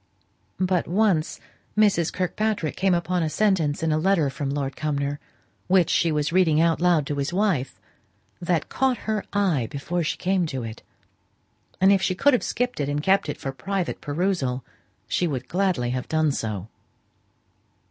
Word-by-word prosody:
But 185 -2 +1
once 185 -4 +1 0.4
Mrs. 195 -6 +3
Kirkpatrick 185 -2 -1
came 190 -2 +2
upon 175 +1 0
a 160 - 0
sentence 165 -6 +1
in 160 - +1
a 155 - +2
letter 165 -5 +2
from 140 +1 -4
Lord 140 -1 -2
Cumnor, 145 -1 -2 0.5
which 180 -3 +3
she 165 - +2
was 150 +1 -1
reading 170 -5 +4
out 165 0 +2
loud 175 -5 +3
to 145 0 -3
his 140 +3 -1
wife, 180 -9 0 0.6
that 170 -3 0
caught 260 -2 +1
her 215 -2 -1
eye 180 - +1
before 160 +5 -3
she 155 - -2
came 185 -2 +1
to 130 -5 -4
it, 110 0 -7 1.0
and 190 +1 +6
if 195 - +2
she 185 -1 0
could 285 +8 +4
have 250 - +3
skipped 245 -5 -2
it 145 -1 -1
and 145 +1 -1
kept 190 -3 +2
it - - -3
for 135 - -4
private 185 +7 -3
perusal, 145 -5 -1 0.4
she 175 - 0
would 130 -5 -4
gladly 180 -10 0
have 125 0 -4
done 155 -1 +2
so. 105 -7 -4
165 Hz, 170 wpm, -24 LUFS, 145-190 Hz, 1.0 s, and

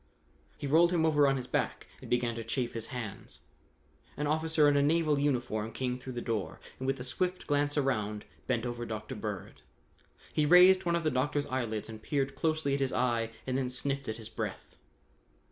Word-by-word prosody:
He - - -5
rolled 165 +5 +5
him 165 -2 +2
over 150 -3 +4
on 135 0 +2
his 125 - -4
back - - -1 0.2
and - - -10
began 120 -1 +1
to 115 0 -5
chafe 120 +2 -2
his 115 -1 -4
hands. 120 -6 -6 0.7
An 150 - -1
officer 155 0 +3
in 145 - +4
a 140 - +4
naval 155 0 +3
uniform 120 -6 0
came 125 0 -2
through 130 0 -7
the 120 - -4
door 110 -4 -2 0.2
and 130 - -3
with 135 0 0
a - - -4
swift 180 +9 -1
glance 145 0 +1
around, 105 -7 0 0.2
bent 120 -2 0
over 120 0 -3
Dr. 110 +2 -5
Bird. 105 -4 -6 0.7
He 155 - +2
raised 180 +4 +7
one 170 0 +2
of 170 - 0
the 155 - +2
doctor's 145 +3 0
eyelids 115 -6 -2
and 110 -1 -9
peered 135 +2 -1
closely 155 -3 0
at 140 - +1
his 135 -1 0
eye 120 -2 +1 0.2
and 130 - -1
then 130 -2 -1
sniffed 135 +1 -1
at 110 - -3
his 110 -2 -7
breath. - - -5
130 Hz, 200 wpm, -31 LUFS, 120-145 Hz, 0.7 s, raised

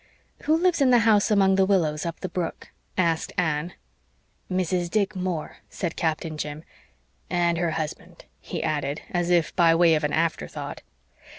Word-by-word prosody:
"Who 310 +2 +4
lives 345 -2 +2
in 270 - +5
the 245 -2 +5
house 210 -2 +4
among 195 -2 +4
the 190 - +4
willows 165 -5 +1
up 165 - -6
the - - -2
brook?" 175 -2 -4 0.3
asked 165 -3 +1
Anne. 160 -1 0 0.8
"Mrs. 180 -1 0
Dick 210 +1 0
Moore," 180 -4 -3
said 175 -3 -4
Captain 160 -1 -2
Jim 150 +1 -5 0.7
"and 170 -1 +1
her 170 -1 +1
husband," 155 -2 -6
he - - -5
added, 150 -2 -2
as 175 -1 0
if 170 -3 +2
by 165 -2 +5
way 170 -1 +5
of 155 -1 +1
an 150 - 0
afterthought. 165 0 -2
175 Hz, 165 wpm, -25 LUFS, 160-190 Hz, 0.8 s, in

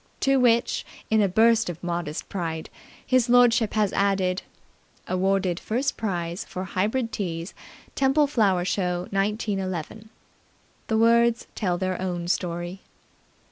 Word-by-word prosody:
To 270 0 +3
which, 235 -1 +2 0.3
in 220 -1 +4
a 200 - +3
burst 225 +2 +3
of 170 0 -7
modest 170 -3 -3
pride, 165 -4 -4 0.3
his 255 -2 +2
lordship 240 -3 +4
has 210 -2 +1
added 195 -2 +1 0.7
"Awarded 185 -1 0
first 255 +5 -1
prize 175 -3 -3
for 185 - -6
Hybrid 215 +6 -1
Teas, 170 -3 -4 0.4
Temple 275 +2 +3
Flower 205 -10 +2
Show, 180 -2 -1
1911". 195 -1 -2 0.8
The 220 - +1
words 235 +1 +3
tell 180 -5 -1
their 185 0 -2
own 175 -2 -3
story. 175 +1 -2
195 Hz, 125 wpm, -25 LUFS, 180-230 Hz, 0.8 s, in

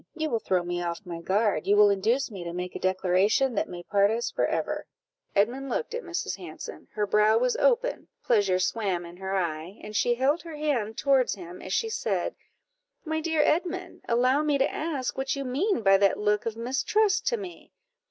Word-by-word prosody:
you 315 -2 -2
will 230 - +1
throw 185 -4 0
me 175 0 -3
off 175 +3 -4
my 170 -2 -6
guard 200 -2 +1
you 205 - +5
will 205 -1 +7
induce 230 +7 +1
me 190 -4 -7
to 170 - -5
make 180 +1 -5
a - - -4
declaration 190 +7 +2
that 205 - -1
may 175 -1 -7
part 200 +2 +3
us 230 +2 -1
for - - +1
ever." - - -2 0.5
Edmund 245 +7 +1
looked 470 - -2
at 480 - -3
Mrs. 345 - -3
Hanson; 170 -5 -9
her 210 -1 0
brow 210 +2 +4
was 250 +1 +1
open, - - +1 0.2
pleasure 205 -6 +3
swam 185 -2 -1
in 170 +1 -11
her 190 +1 -3
eye, 170 +1 -3
and 210 0 -8
she 240 +3 +2
held 275 +7 +1
her 330 -2 -8
hand 255 -8 -1
towards 270 -4 +2
him 180 -2 -10
as 185 - -7
she 450 - +1
said 445 - -1 0.7
"My 315 0 -1
dear 320 -1 +2
Edmund, 360 +4 -1
allow 255 +4 +3
me 300 -2 +2
to 270 - +1
ask 285 -6 -3
what 270 +1 -1
you 275 - -3
mean 285 - 0
by 195 -1 +6
that 195 0 +3
look 210 +1 +1
of 225 -1 -3
mistrust 400 - +1
to 475 - +2
me? 370 -5 -9
225 Hz, 205 wpm, -27 LUFS, 190-290 Hz, 0.7 s, will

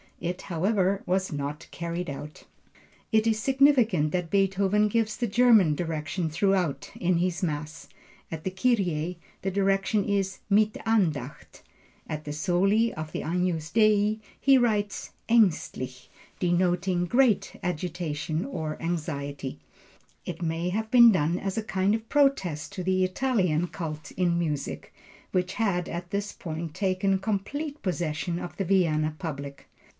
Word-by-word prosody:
It, 175 +1 -4
however, 190 +2 +1
was 190 +1 0
not 145 +1 -4
carried 170 0 -4
out. 145 +2 -8 0.7
It 220 -1 +3
is 220 -1 +2
significant 245 - +3
that 180 -2 -2
Beethoven 195 +2 +2
gives 220 0 0
the 240 - -1
German 220 -7 +5
direction 160 +1 -2
throughout 180 -2 0
in 180 -1 +1
this 180 +1 -1
Mass. 155 -1 -4 0.4
At 160 -1 -5
the - - -1
Kyrie 180 -6 0 0.3
the 195 - 0
direction 195 +1 +1
is 195 -1 -1
Mit 215 +1 +4
Andacht. 160 - -1 0.5
At 155 0 -5
the 145 - -4
soli 195 +8 +2
of 155 0 -6
the - - -3
Agnus 170 -2 -1
Dei 215 -1 +3 0.2
he 275 -1 +5
writes 210 -4 0 0.2
Aengstlich, 160 - +1 0.3
denoting 175 0 +1
great 240 +1 +2
agitation 165 -2 -2
or 160 - -4
anxiety. 145 - -4 0.7
It 175 -1 -6
may 165 +2 -1
have 220 +4 -2
been 235 -2 +8
done 170 -2 +1
as 195 +1 -3
a - - -4
kind 195 0 +1
of 225 0 -6
protest 200 - +1
to 185 -3 -4
the 185 +1 +2
Italian 185 -5 +1
cult 155 -4 -6
in 175 -2 +1
music, 150 -5 -3 0.4
which 180 +1 -1
had 180 -6 0
at 175 +1 -5
this 205 +1 -2
period 160 -2 -6
taken 190 0 +1
complete 275 +10 -3
possession 170 -1 -2
of 175 - -7
the 195 - -1
Vienna 155 -5 +2
public. 140 -4 -6
180 Hz, 140 wpm, -27 LUFS, 160-205 Hz, 0.7 s, been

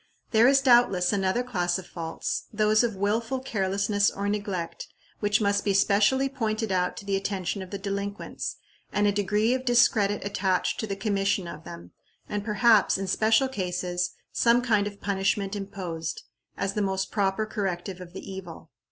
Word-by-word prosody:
There 225 +1 +6
is, 270 0 +5
doubtless, 240 -8 +4
another 195 +4 +1
class 180 -8 -1
of 190 - -8
faults 165 -2 -4
those 215 +1 +3
of 230 -3 -1
willful 225 +6 0
carelessness 200 -3 +1
or 200 +1 -4
neglect 200 -5 -3 0.3
which 205 0 +2
must 200 -1 +1
be 200 -1 +1
specially 210 +7 +3
pointed 225 -5 -2
out 180 -1 0
to 200 - -8
the 200 -1 0
attention 195 0 -2
of 185 - -8
the 200 - -4
delinquents, 200 +1 -4 0.4
and 205 - +1
a 205 - +4
degree 210 +3 +1
of 255 0 -2
discredit 230 -5 +3
attached 190 -2 0
to 220 - -2
the 200 - -3
commission 195 -2 0
of 155 -1 -9
them, 85 +1 -10 0.4
and 205 -1 -3
perhaps, 215 -1 +4
in 195 - -3
special 220 +6 +3
cases, 180 -5 -2 0.2
some 235 +1 +3
kind 210 -4 +2
of 205 -1 -8
punishment 195 0 0
imposed, 185 -5 -5 0.3
as 195 0 -1
the 210 - -1
most 190 -1 -1
proper 200 +1 0
corrective 190 -3 -4
of 175 -1 -10
the 190 - -8
evil. 190 -4 -9
200 Hz, 170 wpm, -26 LUFS, 190-215 Hz, 0.4 s, There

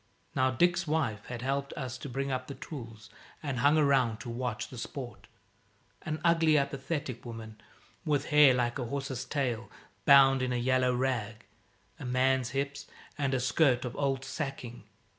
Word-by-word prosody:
Now 130 0 +3
Dick's 175 +6 +2
wife 135 -10 -1
had 120 -1 -6
helped 140 +1 -1
us 130 -2 -5
to 140 - -7
bring 135 +2 -2
up 130 0 -3
the 140 - -7
tools, 115 - -9 0.3
and 140 -5 -2
hung 145 +5 +4
around 135 -7 +3
to 120 - -6
watch 120 -1 -3
the 125 - -8
sport 125 +1 -7 0.7
an 155 0 -4
ugly, 165 -2 +4
apathetic 140 -1 -2
woman, 115 -2 -9 0.4
with 145 -2 0
hair 150 -2 +7
like 120 +1 0
a 125 - -2
horse's 135 -1 -3
tail 125 -5 -2 0.4
bound 135 -2 +7
in 130 0 -1
a - - 0
yellow 125 +1 +2
rag, 120 -3 -2 0.5
a 135 - -7
man's 130 0 +2
hips, 140 +1 -3 0.3
and 140 -2 0
a - - +1
skirt 125 0 +2
of 125 - -5
old 135 -2 -1
sacking. 135 -5 -5
130 Hz, 165 wpm, -30 LUFS, 120-140 Hz, 0.7 s, hair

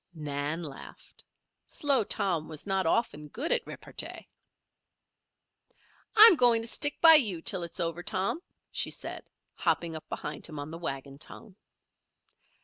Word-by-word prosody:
Nan 150 +2 -4
laughed. 145 -4 -12 0.4
Slow 280 -5 +1
Tom 175 -6 0
was 155 -2 -5
not 195 -3 0
often 160 -7 -1
good 265 - -4
at 485 -2 +1
repartee. - - -5 1.9
"I'm 440 -2 +10
going 240 -5 +4
to - - -5
stick 290 +5 0
by 330 -1 +9
you 215 - +4
till 190 0 -1
it's 170 +2 -5
over, 170 0 -2
Tom," 195 - -2 0.3
she - - +1
said, - - -6 0.2
hopping 165 -2 -1
up 155 - -9
behind - - -5
him 155 -2 -10
on 145 +2 -7
the 165 - -8
wagon 140 -3 -6
tongue. 200 +4 -4
175 Hz, 140 wpm, -28 LUFS, 155-235 Hz, 1.9 s, I'm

